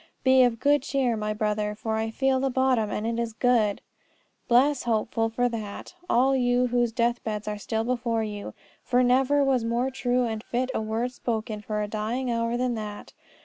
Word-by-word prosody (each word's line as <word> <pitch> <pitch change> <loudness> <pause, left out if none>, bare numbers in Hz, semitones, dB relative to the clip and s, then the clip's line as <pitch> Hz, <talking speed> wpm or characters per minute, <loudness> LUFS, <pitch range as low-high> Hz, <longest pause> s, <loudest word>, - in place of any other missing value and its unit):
"Be 260 0 +6
of 240 -2 +3
good 290 0 +3
cheer, 260 -3 0
my 215 -1 -2
brother, 210 0 -1
for 220 +1 -3
I 220 0 -1
feel 265 +3 +1
the 270 +1 0
bottom, 255 -4 +1
and 210 - -3
it 230 +1 -1
is 230 -1 -3
good!" 225 -3 +2 0.7
Bless 260 +3 +4
Hopeful 225 0 0
for 245 +2 +1
that, 220 - -6 0.2
all 265 +3 +3
you 245 -1 +2
whose 240 -1 +1
deathbeds 230 -3 -1
are 210 0 -3
still 220 +2 -2
before 235 -2 -1
you. 205 -1 -6 0.3
For 250 0 +2
never 265 +3 +3
was 265 -3 +2
more 240 +3 0
true 250 -1 0
and 220 -2 -3
fit 255 +2 -2
word 225 +3 -2
spoken 220 -3 -3
for 210 0 -2
a - - -3
dying 225 +4 -2
hour 230 0 0
than 250 0 0
that. 210 -2 -7
235 Hz, 190 wpm, -26 LUFS, 220-250 Hz, 0.7 s, Be